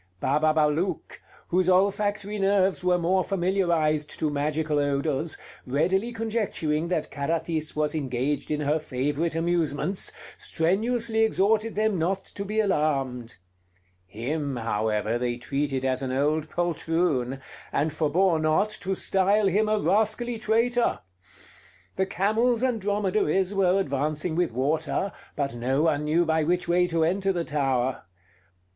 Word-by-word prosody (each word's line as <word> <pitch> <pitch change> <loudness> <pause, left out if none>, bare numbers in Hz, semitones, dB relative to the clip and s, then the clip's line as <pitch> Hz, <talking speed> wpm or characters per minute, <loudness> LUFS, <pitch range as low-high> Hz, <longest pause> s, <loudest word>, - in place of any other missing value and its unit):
Bababalouk, 155 - +1 0.3
whose 185 +1 +2
olfactory 205 +2 +1
nerves 195 -1 +2
were 180 0 +3
more 180 +2 +1
familiarized 170 -6 +1
to 155 -2 0
magical 150 +1 0
odors, 145 +2 0 0.3
readily 185 - +1
conjecturing 210 -9 -1
that 170 -3 -2
Carathis 160 +1 -2
was 150 0 0
engaged 140 -1 -2
in 150 0 -1
her 150 +2 +1
favorite 145 +4 -2
amusements, 165 +1 -1 0.3
strenuously 220 +7 0
exhorted 220 0 +2
them 215 -3 +1
not 190 +4 0
to 200 - -6
be 210 +2 -2
alarmed. 135 - 0 0.7
Him, 135 - -3
however, 110 0 -1
they 120 -1 -1
treated 135 +1 -2
as 130 0 0
an 130 -1 -3
old 150 +3 0
poltroon; 165 -6 -1 0.3
and 150 +1 0
forbore 165 +3 +2
not 155 +7 +2
to 195 -3 -3
style 195 +3 +2
him 205 +3 +2
a 215 - +2
rascally 220 +3 +1
traitor. 230 +3 +1 0.9
The 190 0 0
camels 220 +6 +1
and 245 -4 0
dromedaries 195 -2 +1
were 195 -1 +3
advancing 155 +1 -1
with 175 -3 +1
water, 155 - -1 0.2
but 140 -3 -2
no 130 +5 0
one 150 -2 +1
knew 165 +3 +2
by 160 -1 +1
which 175 +3 0
way 180 +1 +3
to 165 -2 +1
enter 195 +4 +1
the 175 -3 -1
tower. 135 - -1
165 Hz, 130 wpm, -26 LUFS, 145-195 Hz, 0.9 s, were